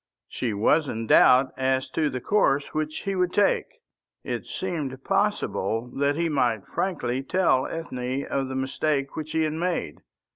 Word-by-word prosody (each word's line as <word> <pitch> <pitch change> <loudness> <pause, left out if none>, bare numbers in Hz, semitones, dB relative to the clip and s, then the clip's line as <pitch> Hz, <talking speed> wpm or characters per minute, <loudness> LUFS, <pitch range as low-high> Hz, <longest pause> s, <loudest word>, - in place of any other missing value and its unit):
She 120 - -3
was 140 +9 +2
in 115 -2 -3
doubt 130 +4 +6
as 130 0 0
to 155 -2 +1
the 130 - -4
course 140 - +1
which 155 0 -3
he 195 - -1
would 180 -1 +1
take. 205 +1 +2 0.6
It - - -4
seemed 145 -8 -4
possible 115 +2 0
that 140 +1 +1
he 170 +2 0
might 120 -9 0
frankly 135 -9 -2
tell 140 -3 +2
Ethne 130 -4 -4
of 135 -1 -2
the 130 - -5
mistake 135 +1 -1
which 155 -1 -5
he 160 - +2
had 155 -1 -1
made. 165 - -2
140 Hz, 160 wpm, -25 LUFS, 130-160 Hz, 0.6 s, doubt